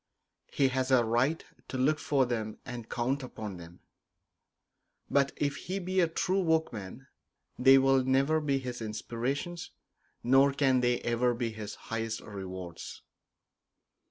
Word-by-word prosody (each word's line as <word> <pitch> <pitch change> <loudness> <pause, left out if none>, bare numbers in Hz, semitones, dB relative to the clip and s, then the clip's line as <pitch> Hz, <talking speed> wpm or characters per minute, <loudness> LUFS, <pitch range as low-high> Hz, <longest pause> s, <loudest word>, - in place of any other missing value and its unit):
He 135 -1 +2
has 130 0 -1
a 125 -3 +4
right 125 +8 +1 0.2
to 130 - -4
look 150 +4 +2
for 135 -3 +2
them 110 -3 -3
and 120 -3 -7
count 130 +4 -1
upon 110 -6 -7
them; 85 0 -13 1.3
but 140 -1 +3
if 145 -1 -1
he 185 +2 -4
be 185 0 -1
a 175 - +4
true 185 +4 0
workman 135 - -1 0.5
they 135 +1 +7
will 135 0 +4
never 135 +4 +2
be 140 -2 +1
his 125 -2 -5
inspirations, 120 +10 -4 0.5
nor 135 +3 +5
can 135 -2 +3
they 120 0 +1
ever 120 +1 +1
be 115 -1 -2
his 110 -1 -7
highest 115 0 -4
rewards. 95 -4 -8
130 Hz, 140 wpm, -30 LUFS, 115-140 Hz, 1.3 s, they